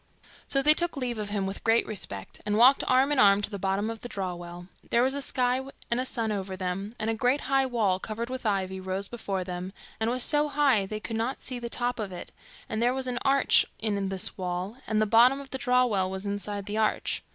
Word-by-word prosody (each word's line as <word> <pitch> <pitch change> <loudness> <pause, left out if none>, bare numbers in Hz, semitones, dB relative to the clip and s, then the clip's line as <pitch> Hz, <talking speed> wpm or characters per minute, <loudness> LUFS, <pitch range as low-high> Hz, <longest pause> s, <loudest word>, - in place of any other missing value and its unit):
So 275 0 +1
they 300 +2 +7
took 345 -1 -1
leave 245 -4 -2
of 210 -1 -3
him 205 -2 -1
with 195 +1 -5
great 225 +1 +3
respect, 100 - -6
and 210 0 0
walked 255 +4 +6
arm 260 +3 +4
in 290 - +2
arm 200 -1 +6
to 205 - -2
the 200 - -5
bottom 195 +2 0
of 225 - -8
the 245 - -7
draw 190 -4 -3
well. 175 0 -9 0.2
There 235 - +3
was 265 +1 +3
a 280 - -2
sky 255 -1 +1 0.3
and 235 - +2
a 255 - -1
sun 225 -4 -1
over 190 -2 -4
them, 190 +4 -4
and 215 - -2
a - - 0
great 250 +5 +1
high 270 0 +2
wall, 210 -7 +1
covered 220 +4 -4
with 255 +1 -5
ivy, 190 -3 -1
rose 190 +1 -3
before 195 -5 -3
them, 180 +1 -5 0.3
and 220 +1 +1
was 250 +1 +1
so 295 0 +2
high 275 -9 +2
they 215 +2 -4
could 225 +1 -4
not 235 +4 -2
see 255 - -3
to - - -8
the 235 - -4
top 245 0 -1
of 205 -3 -3
it; 180 - -8 0.4
and 220 - -3
there 245 +2 +2
was 265 -1 -2
an 245 -1 -2
arch 275 0 +4
in 200 -3 -1
this 190 0 -1
wall, 180 +3 -3
and 215 -1 +1
the 215 - +3
bottom 240 +5 +5
of 275 -1 -11
the 265 - -3
draw 250 0 +3
well 195 -6 0
was 190 +1 -5
inside 205 0 -3
the 210 +1 -3
arch. 215 - 0
220 Hz, 255 wpm, -27 LUFS, 195-250 Hz, 0.4 s, they